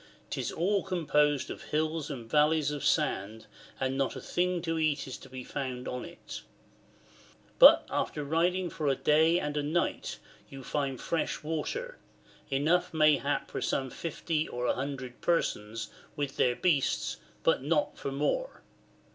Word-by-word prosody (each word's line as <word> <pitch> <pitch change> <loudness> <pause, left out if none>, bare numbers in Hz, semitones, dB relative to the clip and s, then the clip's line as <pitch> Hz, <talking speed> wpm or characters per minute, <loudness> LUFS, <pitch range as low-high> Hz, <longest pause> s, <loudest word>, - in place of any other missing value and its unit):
'Tis - - -2
all 195 +4 +1
composed 150 -5 +1
of - - -8
hills 155 0 -1
and 125 -6 -6
valleys 150 +2 +3
of 145 -1 -4
sand, 110 -8 0 0.3
and 130 0 0
not 135 - 0
a - - -5
thing 180 0 0
to 165 -1 -2
eat 150 -3 +1
is 130 - -6
to 135 - -12
be 130 0 -7
found 130 -2 -4
on 125 0 -4
it. 60 - -9 1.2
But - - +9
after 150 - -2
riding 175 +4 +1
for 155 - -3
a 135 - +3
day 160 +5 +4
and 150 -3 -3
a 150 - +1
night 155 +4 -1 0.3
you 135 -1 -9
find 135 -2 -2
fresh 165 -2 -2
water, 475 - -3 0.5
enough 155 +6 +2
mayhap 150 -2 +3
for - - -3
some 135 -1 -1
50 160 -1 -2
or 125 0 -3
100 130 -1 -3
persons 110 -10 0 0.3
wtch 140 -2 -2
their 125 -1 +3
beasts, 150 -5 +1 0.3
but - - +3
not 150 +2 +1
for 140 - -4
more. 150 - -1
150 Hz, 155 wpm, -30 LUFS, 135-165 Hz, 1.2 s, But